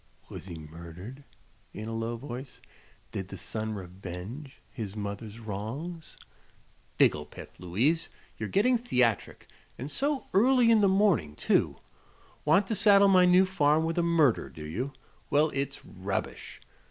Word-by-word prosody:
Was - - -9
he 85 -3 -7
murdered?" 85 - -10 0.5
in 110 +1 -6
a 115 - -4
low 115 +1 -2
voice; 130 0 -8 0.5
"did 95 - -4
the 95 - -8
son 110 +4 -4
revenge 95 - -8
his 105 -5 -6
mother's 105 +1 -5
wrongs?" 115 - -6 0.8
"Figglepiff, 75 0 0
Louise! 120 - +1 0.3
You're - - -5
getting 240 +5 +3
theatric 125 - 0 0.3
and 135 +5 -5
so 280 0 -1
early 240 +3 +5
in 220 -2 +5
the 200 - +5
morning, 190 - +2
too! - - +1 0.7
Want 160 +7 +4
to 220 - -2
saddle 200 0 +6
my 185 -1 +6
new 180 +1 +6
farm 160 -4 +2
with 165 +2 -1
a - - +4
murder, 165 -7 +3
do 80 -2 -10
you? 120 - -3 0.4
Well, 150 +1 +3
it's 140 0 -3
rubbish. 95 0 -5
130 Hz, 140 wpm, -29 LUFS, -, 0.8 s, saddle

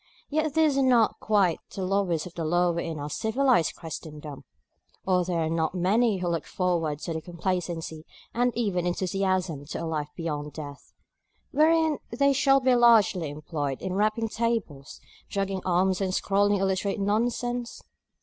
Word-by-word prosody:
Yet 310 0 0
these 310 -4 +3
are - - +3
not 245 -4 +3
quite 200 -6 +2 0.2
the 195 - -3
lowest 185 -4 0
of 180 - -9
the 170 - -4
low 175 +2 +2
in 165 -2 -4
our 145 0 -4
civilised 220 - +1
Christendom; 150 -3 -8 0.6
or 185 -1 +3
are - - +1
there 170 -2 -1
not 160 +1 -1
many 205 +4 +2
who 180 -1 -3
look 170 -2 -2
forward 170 -5 -1
with 160 -2 -4
complacency 170 -3 -4 0.3
and 245 +1 +2
even 185 -7 0
enthusiasm 185 -4 -1
to 165 - -5
a - - -2
life 155 -2 -3
beyond 150 -3 -4
death, 145 -2 -9 0.6
wherein 315 0 +3
they 280 +4 +2
shall 275 0 +4
be 260 -1 +3
largely 225 -9 +4
employed 145 -2 -4
in 190 - -4
rapping 215 +3 +1
tables, 220 -12 -3 0.3
jogging 195 -1 -2
arms 185 +1 +2
and 190 -1 0
scrawling 205 0 +2
illiterate 195 +2 0
nonsense? 240 +4 -1
185 Hz, 155 wpm, -27 LUFS, 165-230 Hz, 0.6 s, shall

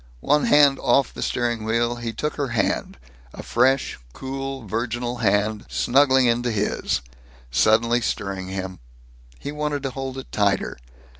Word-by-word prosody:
One 150 +1 +3
hand 145 -2 +5
off 140 - +2
the - - -7
steering 120 -2 -1
wheel, 115 +2 0
he 120 -1 -4
took 150 +7 -3
her 145 -2 -2
hand 120 -2 -1 0.4
a - - -8
fresh, 130 +3 +1
cool, 135 -1 -5
virginal 120 +3 -2
hand, 105 -1 +1
snuggling 130 0 +4
into 120 +1 +2
his, 105 - -1 0.5
suddenly 115 - +3
stirring 100 -4 -3
him. 95 -1 -5 0.6
He 145 - -6
wanted 150 -1 -2
to 135 - -2
hold 135 0 -5
it 130 - -8
tighter. 100 -9 0
120 Hz, 145 wpm, -23 LUFS, 110-135 Hz, 0.6 s, hand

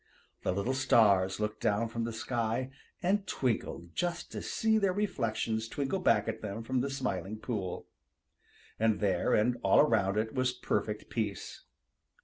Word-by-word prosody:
The - - 0
little 100 +8 -1
stars 105 -8 +4
looked 105 0 -2
down 105 +3 +1
from 115 0 -3
the 115 - -3
sky 115 +2 -2 0.3
and 195 +2 +1
twinkled 105 - -2
just 175 -1 -2
to - - -5
see 220 0 +1
their 195 -3 +2
reflections 115 - -1
twinkle 140 +9 -2
back 115 - +3
at 110 0 -3
them 105 +2 -5
from 130 +2 0
the 140 - -1
Smiling 110 -7 -3
Pool. 105 -6 -4 0.9
And 110 -2 +2
there 95 -4 +2
and 120 +3 +2
all - - +5
around 105 -8 +3
it 110 +1 -1
was 130 -1 +1
perfect 105 -1 -2
peace. 105 -5 -4
115 Hz, 155 wpm, -31 LUFS, 105-130 Hz, 0.9 s, all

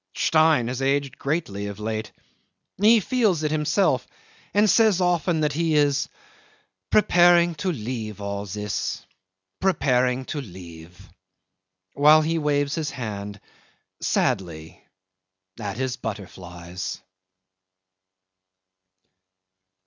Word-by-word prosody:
Stein 155 -6 +3
has 125 +2 -4
aged 135 -1 -1
greatly 135 -10 -2
of 100 0 -7
late. 110 0 -4 0.7
He 220 +2 +6
feels 210 - +1
it 150 - 0
himself, 155 +6 +1 0.4
and 210 +1 +3
says 215 -3 +4
often 175 -2 +1
that 150 -1 0
he 165 0 0
is 145 -2 +2 0.8
"preparing 175 -4 +5
to 185 - 0
leave 110 - -5
all 100 0 -4
this; 105 +1 -4 0.5
preparing 130 -8 +1
to 145 - -4
leave.. 90 -5 -12 0.4
." 95 0 -53
while 150 +2 +6
he 165 +1 0
waves 145 -1 0
his 160 -2 -2
hand 105 -4 -6 0.6
sadly 80 -4 -2 0.8
at 105 -2 -5
his 130 -1 -2
butterflies. 90 -4 -7
135 Hz, 105 wpm, -24 LUFS, 100-160 Hz, 0.8 s, He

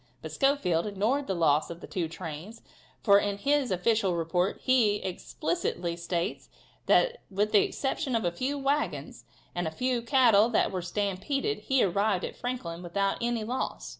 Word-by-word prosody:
But - - -6
Schofield 270 - +1
ignored 220 +8 0
the 190 - -1
loss 155 -3 +2
of 170 0 -7
the - - -9
two 175 -3 -2
trains, 165 +5 -8 0.4
for, 200 -1 +6
in 205 -1 -2
his 280 +2 +1
official 190 0 +1
report, 175 +3 0
he 240 -6 +4
explicitly 185 - -3
states 170 +3 -3 0.4
that - - +3
with 205 +2 0
the 210 - +6
exception 270 -1 -2
of 225 - 0
a 175 - +1
few 260 +11 -2
wagons, 280 +2 -2 0.3
and 175 -1 -2
of 160 - -4
a - - -22
few 250 -1 0
cattle 230 -4 +5
that 230 - +2
were 185 -2 -2
stampeded, 205 - -2
he 270 -2 +3
arrived 200 0 +1
at - - -7
Franklin 185 -10 -4
without 195 +3 -1
any 235 -1 0
loss. 245 +4 -3
205 Hz, 170 wpm, -28 LUFS, 175-255 Hz, 0.4 s, for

